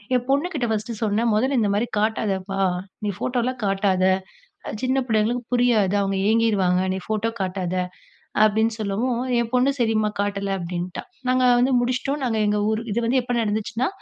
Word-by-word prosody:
என் 245 - +1
பொண்ணுகிட்ட 285 -1 +1
ஃபர்ஸ்ட்டு 220 +1 -2
சொன்னேன் 220 +2 +1
'மொதல்ல 260 +6 +2
இந்த 210 - +2
மாரி 215 +4 0
காட்டாதப்பா 200 -3 -1 0.5
நீ 205 - 0
ஃபோட்டோலா 250 0 -1
காட்டாத 195 -2 +1 0.8
சின்ன 260 +1 +1
பிள்ளைங்களுக்கு 225 +2 +1
புரியாது 235 -6 +3
அவங்க 195 -1 0
ஏங்கிருவாங்க 205 -5 +3
நீ 190 - -2
ஃபோட்டோ 220 +1 0
காட்டாத' 185 -1 -2 0.7
அப்படின்னு 220 +2 +2
சொல்லவு 210 +3 -1 0.3
ஏ 235 - +3
பொண்ணு 250 +2 +4
"சரிம்மா 220 -2 +2
காட்டல" 200 -1 -1
அப்படின்ட்டா. 175 0 -4 0.3
நாங்க 255 0 +3
வந்து 255 +2 +3
முடிச்சிட்டோம் 255 +4 -1
நாங்க 225 -3 0
எங்க 210 0 +1
ஊர் 220 0 0
இது 220 - 0
வந்து 255 +2 +3
எப்போ 245 0 -3
நடந்துச்சுன்னா 220 +3 -1
220 Hz, 155 wpm, -23 LUFS, 200-245 Hz, 0.8 s, பொண்ணு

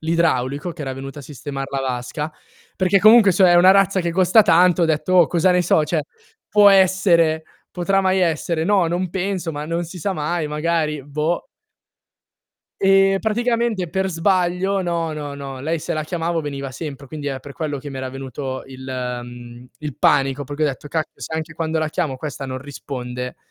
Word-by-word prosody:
l'idraulico 160 -1 0
che 155 - -8
era 135 - -4
venuto 135 +2 -8
a - - -12
sistemar 135 -1 -6
la 135 -1 -2
vasca, 130 +4 -3 0.5
perché 190 +1 +3
comunque, 215 -1 +7
cioè, 185 0 +5
è - - +5
una 180 +2 +7
razza 195 -1 +3
che 170 -1 -2
costa 185 +4 +5
tanto, 180 -1 +4
ho - - +5
detto: 160 +3 0
"Oh 175 -3 +7
cosa 175 +2 +2
ne 180 0 +3
so" 160 -2 +3
cioè, 155 0 -1 0.5
può 210 -1 +6
essere? 175 -4 +4 0.3
Potrà 195 +2 +1
mai 190 0 +2
essere? 165 -1 0
No, 195 -1 +3
non 175 +1 -2
penso 190 -2 -2
ma 150 -1 -5
non 165 +2 -2
si 175 +2 -9
sa 195 +4 -2
mai, 160 0 -2
magari 150 -1 -1
boh. 150 +4 -2 1.3
E 195 0 +4
praticamente 230 -3 0
per 190 +3 -1
sbaglio 185 +2 +1
no, 170 -2 -2
no, 145 -2 -6
no, 135 -2 -7
lei 160 +4 -1
se - - -4
la 155 - -2
chiamavo 165 +1 -2
veniva 140 -2 -5
sempre, 140 -1 -7
quindi 145 +1 -5
è 135 -1 -4
per 140 +2 -11
quello 150 -1 -4
che 145 - -8
mi 135 -1 -7
era 130 0 -4
venuto 130 0 -6
il 130 -1 -11 0.4
mhmm, 120 0 -11
il 150 -3 -6
panico 135 +1 +2
perché 145 +3 -5
ho - - +3
detto: 145 +1 -5
"Cacchio 160 +1 -4
se 160 - -5
anche 160 0 -4
quando 160 0 -2
la 155 -1 0
chiamo 155 -4 -2
questa 140 0 -6
non 130 0 -5
risponde". 125 -2 -6
160 Hz, 195 wpm, -21 LUFS, 140-180 Hz, 1.3 s, comunque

